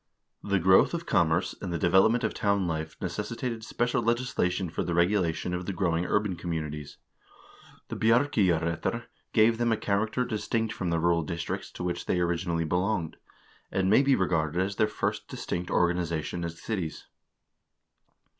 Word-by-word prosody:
The 100 -1 0
growth 95 - +5
of 170 0 -5
commerce, 80 +2 +2
and 95 - -4
the 85 - -1
development 95 +8 +4
of - - 0
town 100 -2 +1
life 80 -1 -3
necessitated 115 -1 -4
special 120 +2 0
legislation 115 -6 0
for - - -2
the 85 - -2
regulation 90 -1 +1
of 90 0 -4
the 100 - -2
growing 85 -2 0
urban 105 -3 +1
communities. 75 -4 -5 0.9
The - - -4
"Bjarkeyjarrettr" 100 - +1 0.3
gave 110 +1 +4
them 120 -1 +2
a 110 - +2
character 110 +5 0
distinct 110 -1 -1
from 90 - -3
the 85 -1 +1
rural 85 0 +2
districts 85 +2 -4
to - - -6
which 90 -1 -3
they 90 - +1
originally 85 -1 0
belonged, 90 0 -1 0.5
and 95 0 +1
may 110 - +6
be 140 -1 +4
re 95 - +1
garded 80 -1 0
as 95 +2 -1
their 110 - +3
first 105 - -3
distinct 90 0 -4
organization 85 -1 0
as 85 0 -5
cities. 95 -5 -4
90 Hz, 160 wpm, -28 LUFS, 85-110 Hz, 0.9 s, may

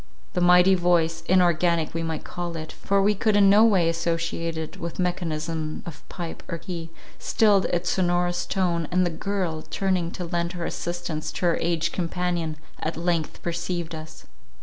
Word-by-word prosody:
The 180 - 0
mighty 180 +2 +6
voice, 170 -2 +2
inorganic 170 -3 +3
we 165 - -2
might 160 -2 -3
call 175 -1 -5
it, 155 0 -6
for 200 0 +1
we 210 +1 +4
could 210 +1 +1
in 200 -1 +6
no 210 +2 +7
way 195 -7 +4
associate 165 0 -1
it 160 +4 -5
with 170 -2 -5
mechanism 165 -3 -2
of 155 -3 -8
pipe 170 -3 -6
or 165 - -3
key, 170 -1 -6 0.3
stilled 205 -3 +3
its 175 0 0
sonorous 175 -1 +1
tone, 175 -4 0
and 180 0 +2
the 175 - 0
girl, 175 -2 -2
turning 185 -1 -1
to 180 - -5
lend 170 +1 -2
her 175 -2 -4
assistance 175 -3 -3
to - - -2
her 170 - +3
aged 165 -1 0
companion, 175 -3 -2 0.2
at 160 - -3
length 170 -2 -1
perceived 170 0 -3
us. 160 0 -9
175 Hz, 170 wpm, -25 LUFS, 165-180 Hz, 0.3 s, no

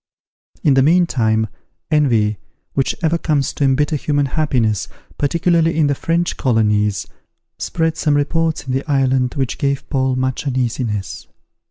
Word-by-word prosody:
In 145 - +4
the 135 - +4
meantime, 130 -9 +2 0.5
envy, 115 -9 +2 0.4
which 135 - 0
ever 165 +1 +2
comes 145 -5 0
to - - -2
embitter 145 +3 +2
human 145 0 0
happiness, 125 - 0 0.3
particularly 165 +2 +2
in 155 - +4
the 145 - +2
French 170 +4 -1
colonies, 105 -5 +1 0.5
spread 160 -1 -1
some 150 -2 +1
reports 160 +2 0
in 130 - -3
the 135 +4 -3
island 130 -2 +1
which 135 -3 -2
gave 140 -1 -1
Paul 130 -2 +1
much 130 +2 -2
uneasiness. 120 -5 -2
135 Hz, 140 wpm, -18 LUFS, 125-155 Hz, 0.5 s, In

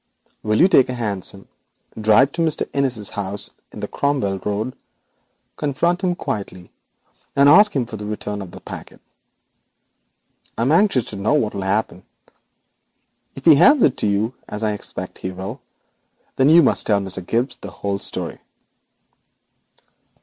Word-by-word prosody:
Will 110 0 0
you 180 - +7
take 135 -9 +4
a 125 - -3
hansom, 100 -4 -4 0.5
drive 110 +5 +4
to 170 - -3
Mr. 160 -2 0
Innis's 125 -7 -1
house 100 0 -3 0.2
on - - -9
the - - -3
Cromwell 130 -10 -1
Road, 105 +6 -3 0.8
confront 170 +5 0
him 180 -2 0
quietly, 100 - -6 0.6
and 140 0 +5
ask 205 +8 +7
for 120 -5 -2
the 105 0 -7
return 105 -1 -4
of 95 - -8
the - - -12
packet? - - -10 1.6
I 115 - 0
am 130 - +2
anxious 165 - +3
to 105 - -6
know 105 +9 +1
what 110 -8 0
will 100 - -4
happen. 95 -1 -2 1.3
If 135 - -11
he 165 - +9
hands 250 - +6
it 130 - +4
to - - 0
you, 105 +4 0 0.2
as 105 +2 -5
I 110 - +1
expect 105 - -5
he 95 - -4
will, 95 +7 -7 0.7
then 135 +2 +3
you 165 +1 +7
must - - +3
tell 105 -2 +3
Mr. 95 -2 -5
Gibbes 120 +8 -1
the 100 - -7
whole 100 +1 -4
story.' - - -4
110 Hz, 155 wpm, -20 LUFS, 100-140 Hz, 1.6 s, he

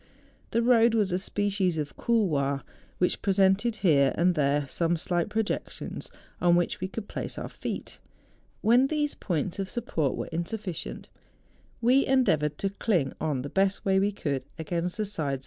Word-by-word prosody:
The 230 - +1
road 235 -1 +5
was 205 -4 +2
a 180 - +1
species 195 -3 0
of 150 -2 -4
couloir, 145 - +1 0.3
which 180 - +1
presented 195 +3 +3
here 140 -5 +5
and 180 +2 +3
there 145 -2 +1
some 170 +4 +1
slight 175 +1 0
projec¬ 220 -1 -1
tions - - -6 0.3
on 175 -1 +5
which 175 0 0
we 185 - -1
could 205 +2 -6
place - - -5
our - - -4
feet. - - -6 0.6
When 245 +4 +5
these 295 0 0
points 175 +1 -2
of 195 -1 -2
support 165 - -1
were - - -3
insufficient, 175 +2 -4 0.7
we 255 +4 +5
endeavoured 155 - +2
to 195 - -1
cling 180 - 0
on 145 -5 -1
the 140 - -5
best 195 +3 +1
way 190 -1 +3
we 200 +1 +2
could 140 -9 -3
against 170 +4 -2
the 215 - 0
sides 205 - -6
THE 145 -4 -1
JUNGFRAU. 135 - -2
185 Hz, 175 wpm, -27 LUFS, 155-215 Hz, 0.7 s, road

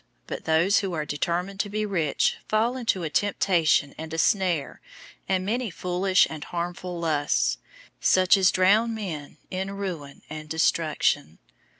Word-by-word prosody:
006:009 - - -44 0.2
But - - -6
those 165 +5 +3
who 195 -3 -3
are 155 -2 -2
determined 175 +6 -2
to 205 - -1
be 215 +1 -2
rich 170 -8 0
fall 225 +3 +1
into 225 -8 -1
a 160 - -2
temptation 170 -8 +2
and 160 0 -6
a 165 - -4
snare 180 -5 +1 0.5
and 185 -1 +1
many 235 +3 -1
foolish 185 +2 +2
and 155 -2 -7
harmful 175 0 -5
lusts, 145 - +1 0.4
such 185 +1 +4
as 190 -1 +4
drown 210 +5 +3
men 165 -9 -6
in 190 +1 -3
ruin 175 -8 -6
and 155 0 -8
destruction. 155 - +1
180 Hz, 155 wpm, -25 LUFS, 160-195 Hz, 0.5 s, such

